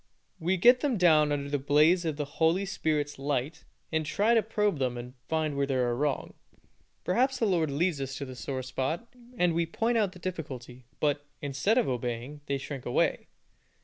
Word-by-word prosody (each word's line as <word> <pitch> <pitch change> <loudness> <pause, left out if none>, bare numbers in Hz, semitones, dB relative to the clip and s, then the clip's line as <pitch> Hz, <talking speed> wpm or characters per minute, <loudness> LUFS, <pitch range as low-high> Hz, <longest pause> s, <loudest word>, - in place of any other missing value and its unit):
We 180 +3 +1
get 245 +7 +6
them 260 -4 0
down 155 -5 +5
under 140 -1 -1
the 145 0 -1
blaze 150 +6 +4
of 155 -3 -1
the 150 - -2
Holy 165 +6 +1
Spirit's 150 -6 -1
light, 140 +1 -2 0.3
and 160 -1 +1
try 200 +10 +2
to 230 - +5
probe 210 -6 0
them 125 -2 -1
and 120 +1 -7 0.2
find 155 -2 0
where 140 0 0
they 135 - 0
are 120 -2 +1
wrong. 145 +2 -1 0.7
Perhaps 255 +8 +2
the 230 - +1
Lord 170 -6 +2
leads 150 +1 0
us 135 0 -4
to 140 - -4
the 130 -1 -8
sore 130 +1 -4
spot, 135 - -3 0.3
and 175 -1 +3
we 170 0 0
point 230 +7 +1
out 200 -4 +1
the - - -12
difficulty, 135 -9 -6
but, 145 -1 0
instead 145 - 0
of 250 - +3
obeying, 125 +3 -3
they 140 - 0
shrink 135 -1 -6
away. 120 - 0
150 Hz, 195 wpm, -29 LUFS, 135-180 Hz, 0.7 s, get